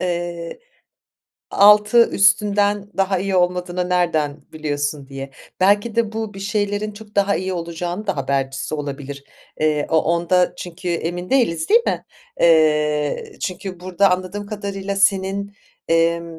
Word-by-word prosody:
eee, 175 - -4 0.9
"Altı 210 +3 +6
üstünden 205 0 +2
daha 195 -1 +1
iyi 195 0 -1
olmadığını 180 0 0
nereden 160 -5 0
biliyorsun?" 145 -2 -3
diye. 135 0 -7 0.3
Belki 205 +4 +3
de 225 -2 +1
bu, 220 -2 -4
bir 195 - -8
şeylerin 205 +1 -1
çok 210 0 -14
daha 200 0 +3
iyi 185 0 -3
olacağının 175 +4 -4
da 195 - -1
habercisi 135 +2 -2
olabilir. 140 -1 -6 0.4
Eee, 150 -1 +1
o 160 - +4
onda 170 +2 +2
çünkü 180 +1 -7
emin 175 +1 -3
değiliz, 230 -12 +1
değil 460 +3 +6
mi? - - -1 0.4
Eee, 150 -3 +2
çünkü 185 -1 -5
burada 185 +1 +2
anladığım 185 +3 -2
kadarıyla 200 -1 -4
senin, 195 +1 +1 0.3
emm 165 0 +1
180 Hz, 130 wpm, -20 LUFS, 160-200 Hz, 0.9 s, Altı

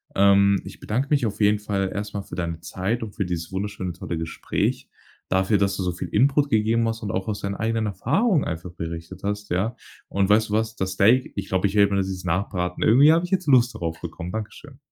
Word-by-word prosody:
Ähm, 100 0 +5
ich - - -10
bedanke 125 +6 -1
mich 140 -5 +2
auf 105 -1 -3
jeden 105 0 +3
Fall 100 -2 -1
erst 105 +1 -4
mal 100 - -3
für - - -9
deine 85 -2 -3
Zeit 95 +7 -3
und 105 -3 -7
für 100 - -1
dieses 85 -1 -4
wunderschöne 95 -2 -3
tolle 85 0 -5
Gespräch. 80 0 -2 0.4
Dafür, 95 +3 +2
dass 100 0 +1
du 95 - -2
so 90 -1 -1
viel 90 0 -6
Input 140 - +3
gegeben 110 +1 +2
hast 115 0 -4
und 105 - -2
auch 95 +1 -2
aus 105 - -2
deinen 100 0 -3
eigenen 110 0 -1
Erfahrungen 145 - +1
einfach 85 +1 -5
berichtet 85 +2 -7
hast, 105 0 -3
ja. 105 +7 -1 0.3
Und 100 0 +1
weißt 110 +1 +4
du - - -3
was? 110 +1 0
Das 95 0 -2
Steak, 120 +8 +3
ich 100 -1 -4
glaubw, 95 +1 0
ich 100 - -7
werde 100 -1 +4
mir 100 - +2
das 95 0 -1
jetzt 95 -1 -6
nachbraten. 90 0 -1
Irgendwie 140 +8 +6
hab 170 +2 +2
ich 180 - -4
jetzt 185 -4 0
Lust 125 -3 +5
darauf 80 -5 -4
bekommen. 85 +2 -6
Dankeschön. 110 +6 -7
100 Hz, 235 wpm, -24 LUFS, 95-110 Hz, 0.4 s, Irgendwie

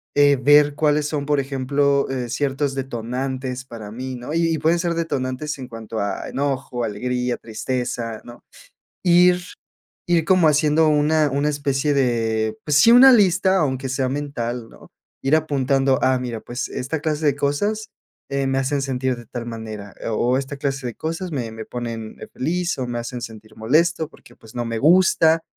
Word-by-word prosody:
eh, 145 -1 +5
ver 145 0 +5
cuáles 150 -1 +2
son, 145 -1 -3
por 145 -1 +2
ejemplo, 140 +1 0
eh, 125 -2 -3
ciertos 140 +2 -1
detonantes 130 0 -4
para 110 -5 -9
mí, 130 +3 -5
¿no?, 125 +5 -6
y 165 0 +2
y - - 0
pueden 160 +3 +2
ser 170 -1 0
detonantes 150 -3 -2
en 130 - -7
cuanto 115 -2 -7
a 100 0 -3
enojo, 135 -3 -2
alegría, 125 +3 -2
tristeza, 115 0 -4
¿no? 120 0 -13 0.6
Ir 180 0 +5 0.7
ir 170 -2 +3
como 185 -4 +5
haciendo 150 +1 +3
una 150 0 +3
una 140 +2 0
especie 145 0 0
de 115 -4 0
pues 150 - +1
sí, 230 +11 +7
una 255 +2 +9
lista, 190 -3 +4
aunque 135 -4 -1
sea 130 0 -1
mental, 125 -5 -4
¿no?, - - -17 0.3
ir 135 - +3
apuntando, 135 -3 +1
"ah, 130 0 +3
mira, 120 -3 -4
pues, 120 +4 -5
esta 140 +5 -4
clase 155 0 -2
de 140 -2 +2
cosas, 205 +10 -1 0.4
eh, 140 0 0
me 135 - 0
hacen 135 +1 0
sentir 130 -1 -1
de 120 -1 -12
tal 120 +1 -6
manera, 110 -3 -7
o 120 +2 +1
o - - +2
esta 140 +1 -5
clase 135 -2 -2
de 120 - -4
cosas 165 - -4
me 120 -6 -3
me 110 0 -7
ponen 115 -3 -6 0.2
feliz, 175 +4 -1
o 130 - -2
me 120 0 -3
hacen 120 +1 -5
sentir 110 -1 -10
molesto 155 +8 +1
porque, 120 -6 -19
pues, 110 - -16
no 120 - -2
me 115 -1 -3
gusta," 165 +2 +4
135 Hz, 180 wpm, -22 LUFS, 120-150 Hz, 0.7 s, una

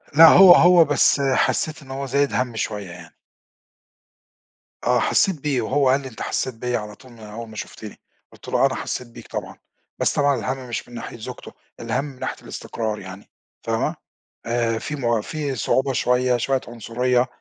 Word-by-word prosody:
لأ 165 +1 +10
هو 185 0 +9
هو 175 -1 +6
بس 145 -1 +3
حسّيت 140 +3 0
إن 135 -1 -12
هو 135 +1 -4
زايد 140 +2 0
هَم 125 -2 -1
شوية 105 -4 -4
يعني. 85 -2 -13 1.7
آه، - - +3
حسّيت 175 -8 +1
بيه 140 -5 0
وهو 135 +3 +1
قال 135 +2 +3
لي: 135 - -8
"أنت 115 - -11
حسّيت 130 - -2
بيَّ 125 +1 -2
على 105 -1 -7
طول 130 +2 -17
من 115 - -16
أول 110 +2 -9
ما 110 - -12
شُفتِني." 105 0 -8 0.3
قُلت - - -16
له: - - +3
"أنا - - 0
حسّيت 125 - -4
بيك 115 - -13
طبعًا." - - -6 0.4
بس - - +1
طبعًا 145 -1 +2
الهَم 130 +2 -4
مش 115 - -4
من 120 - -15
ناحية 115 - -7
زوجته، 110 - -9 0.3
الهَم 120 +5 -2
من 135 -3 -11
ناحية - - -3
الإستقرار 110 -2 -5
يعني، 95 +1 -11 0.3
فاهمة، - - -1 0.5
آآ 115 -1 0
في 150 - -5
م 120 -5 0
في 145 0 -4
صعوبة 130 +5 0
شوية، 125 0 +2
شوية 130 +2 0
عنصرية 120 +2 0
125 Hz, 185 wpm, -22 LUFS, 115-140 Hz, 1.7 s, لأ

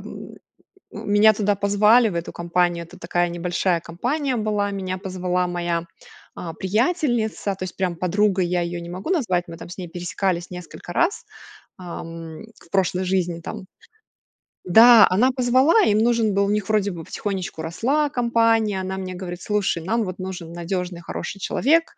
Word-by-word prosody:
м, - - -9 0.6
меня 210 +1 +4
туда 205 -1 +1
позвали 210 +4 +4
в 175 - -6
эту 170 - -3
компанию. 170 0 0
Это 180 +2 -15
такая 175 -1 0
небольшая 175 0 0
компания 250 - -2
была. 210 -2 0
Меня 185 -1 -3
позвала 180 -1 -1
моя, 175 -1 -2 0.5
а, 165 -2 -6
приятельница. 220 - 0
То 185 - -7
есть 180 - -6
прям 180 -3 -1
подругой 190 +1 +1
я 175 0 0
её 170 0 -3
не 170 - -8
могу 185 - -6
назвать. 185 - +1
Мы 165 -1 -9
там - - -10
с 180 - -9
ней 180 -2 -6
пересекались 175 +1 -2
несколько 180 0 -9
раз, 350 - +1 0.5
ам, 165 -1 -8 0.2
в - - -19
прошлой 185 -1 +1
жизни 180 -2 0
там. 185 - -7 1.0
Да, 230 +4 +9
она 235 +8 +4
позвала 260 - +4
им 210 +1 +3
нужен 230 -2 +2
был, 200 0 +2
у - - -1
них 210 0 -1
вроде 210 -2 +2
бы 170 -2 -7
потихонечку 190 -3 -4
росла 265 - 0
компания. 230 -5 +2
Она 190 0 -4
мне 185 -1 -5
говорит: 180 -1 -7
"Слушай, 200 -5 -1
нам 225 +5 0
вот 185 -3 -5
нужен 185 -3 -6
надёжный, 175 0 -4
хороший 200 +3 -6
человек, 325 - +2
190 Hz, 165 wpm, -22 LUFS, 175-215 Hz, 1.0 s, Да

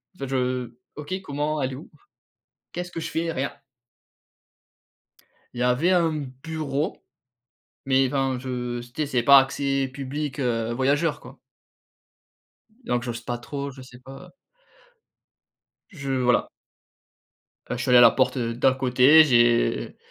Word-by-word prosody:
En - - -25
fait, 135 - -4
je 125 -2 -1 0.2
OK. 150 +4 -7
Comment? 150 -2 -3
Elle 130 0 -2
est - - -5
où? 145 - -12 0.8
Qu'est-ce 175 0 -6
que 165 - -5
je - - -4
fais? 165 0 -2
Rien. 135 0 -2 2.0
Il 120 - -6
y - - +1
avait 125 +9 +2
un 170 -2 +3 0.3
bureau 155 -2 -3 0.9
mais 135 0 +3
enfin, 135 -1 -1
je 125 -2 -4
tu 120 0 -13
sais, 155 +1 -1
c'est 125 -3 0
pas 140 +3 +8
accès 135 0 -1
public, 140 +2 -5
heu, 115 -2 -1
voyageur, 140 +5 0
quoi. 130 +2 -14 1.5
Donc 120 - -1
j'ose 120 -1 -5
pas 120 +1 -4
trop. 140 +3 -6
Je 130 0 -12
sais 125 -1 -15
pas. 135 +1 -12 1.6
Je 140 -8 -7
voilà. 125 -2 +1 1.2
Heu, 125 - -2
je - - -3
suis - - -4
allé 125 - +7
à - - +8
la - - +9
porte, 130 +1 +1
heu, 115 -2 -2
d'à 125 +2 +3
côté. 130 +4 +5
J'ai 120 -4 +2
135 Hz, 150 wpm, -24 LUFS, 125-145 Hz, 2.0 s, la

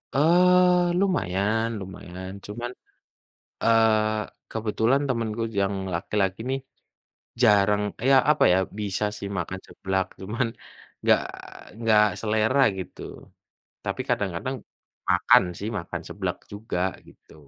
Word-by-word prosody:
Eee, 180 +3 +4
lumayan, 110 - +1
lumayan, 95 -1 -8
cuman, 120 +4 -5 0.9
eee, 110 -1 +3 0.3
kebetulan 110 +4 +1
temenku 115 -2 -1 0.2
yang 100 0 0 0.2
laki-laki 95 +2 -1
nih, 135 - 0 0.8
jarang 105 -2 +4 0.3
ya, 135 - +7 0.2
apa 150 - +2
ya, - - +4 0.2
bisa 105 0 -1
sih 100 - -6
makan 95 +3 -4
seblak, 95 -1 -2 0.2
cuman 115 +6 -1 0.6
nggak - - +5 0.6
nggak 110 -2 +5 0.2
selera, 110 +4 +1 0.2
gitu. 95 - -8 0.8
Tapi - - -2
kadang-kadang 100 +7 -1 0.5
makan - - +5 0.2
sih, 105 - -3
makan 85 - -6
seblak - - -3
juga, 100 -2 -4 0.3
gitu. - - -19
110 Hz, 105 wpm, -25 LUFS, 95-120 Hz, 0.9 s, ya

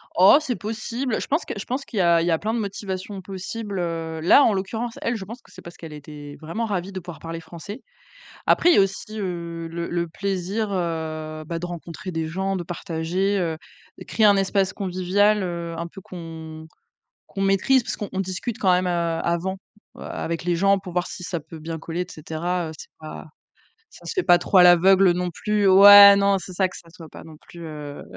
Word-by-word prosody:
Oh 190 +10 +7
c'est 255 -6 -2
possible, 225 +3 -3
je - - -5
pense 295 +5 0
que - - -5
je 200 - -6
pense 270 +3 -3
qu'il 215 - -4
y - - +4
a 170 -1 +4
il - - 0
y 175 - +1
a 160 - +1
plein 220 +2 -2
de 235 - -1
motivations 195 -1 -5
possibles, 195 +2 -6
heu, 165 -2 -3
là, 230 - +6
en 220 - +3
l'occurrence, 220 +5 -4
elle, 235 +1 -1
je 200 - -5
pense 230 +5 -10
que - - -22
c'est - - -13
parce 170 - -12
qu'elle 160 -2 -9
était 145 -1 -10
vraiment 195 +9 -3
ravie 195 -2 -3
de 190 - -5
pouvoir 175 -1 -10
parler 165 0 -6
français. 190 +9 -10 0.7
Après, 350 - +4
il - - +5
y - - +3
a - - +7
aussi 210 +3 -3
heu, 170 -3 -5
le 170 +1 -5
le 170 -1 -1
plaisir, 195 +4 -3
heu, 160 -3 -3
bah, 165 +1 -4
de 175 - -4
rencontrer 175 +1 -7
des 160 -1 -3
gens, 190 +3 -2
de 175 - -3
partager, 175 +4 -2
heu, 165 -3 -2 0.5
créer 220 - +2
un 205 -1 +6
espace 195 -1 +1
convivial, 195 +2 +1
heu, 170 -2 -4
un 170 - -4
peu 195 +3 -12
qu'on 160 -3 -9 0.6
qu'on 195 - -6
maîtrise 195 +7 +3
parce - - -4
qu'on 195 -2 -5
discute 195 +5 -4
quand 190 -2 +3
même, 180 +1 +2
heu, - - 0 0.3
avant 175 +3 -1 0.4
avec 165 0 -5
les 175 -1 0
gens 195 +3 +3
pour 185 -2 -9
voir 180 0 0
si 180 - -8
ça 170 -2 -3
peut 160 +1 -12
bien 160 +1 -5
coller, 165 +2 -4
et - - -3
cetera, 165 +3 -3
heu, - - -7
c'est - - -11
pas 155 0 -9 0.7
ça - - -16
se - - -4
fait 370 - 0
pas 175 - +6
trop 185 - +1
à 180 - +9
l'aveugle, 185 +2 +6
heu, - - +3
non 180 0 -2
plus, 210 +4 -1
heu, 190 - +5
ouais, 200 0 +10
non, 200 0 +3
c'est 185 - -8
ça, 185 +1 +1
que - - -13
ça 170 - -15
soit 165 -1 -12
pas - - -12 0.2
plus, 170 - -12
heu, 150 -2 -8
180 Hz, 230 wpm, -23 LUFS, 165-200 Hz, 0.7 s, ouais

